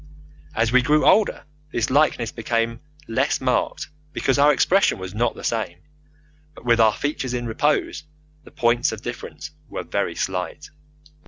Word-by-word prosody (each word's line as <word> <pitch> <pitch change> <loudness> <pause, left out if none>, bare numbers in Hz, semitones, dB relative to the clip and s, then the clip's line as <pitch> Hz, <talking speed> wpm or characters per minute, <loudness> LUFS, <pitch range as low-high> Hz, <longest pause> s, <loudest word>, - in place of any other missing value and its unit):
As 110 0 +1
we 130 0 +5
grew 150 +3 +3
older 210 +1 +4 0.3
this 120 -2 -1
likeness 130 -5 +2
became 115 0 -1 0.3
less 115 - 0
marked - - -1 0.3
because 135 +1 +1
our 145 +1 +6
expression 190 +7 +3
was 95 0 -7
not 115 +2 0
the - - -10
same, 110 -7 -2 0.8
but - - -14
with 120 -1 +3
our 110 -2 +5
features 135 -4 -2
in 120 0 -3
repose 120 +7 0 0.4
the - - -14
points 120 +2 +1
of 110 - -7
difference - - -7 0.2
were - - -5
very - - -2
slight. 95 +11 -4
120 Hz, 155 wpm, -23 LUFS, 115-145 Hz, 0.8 s, our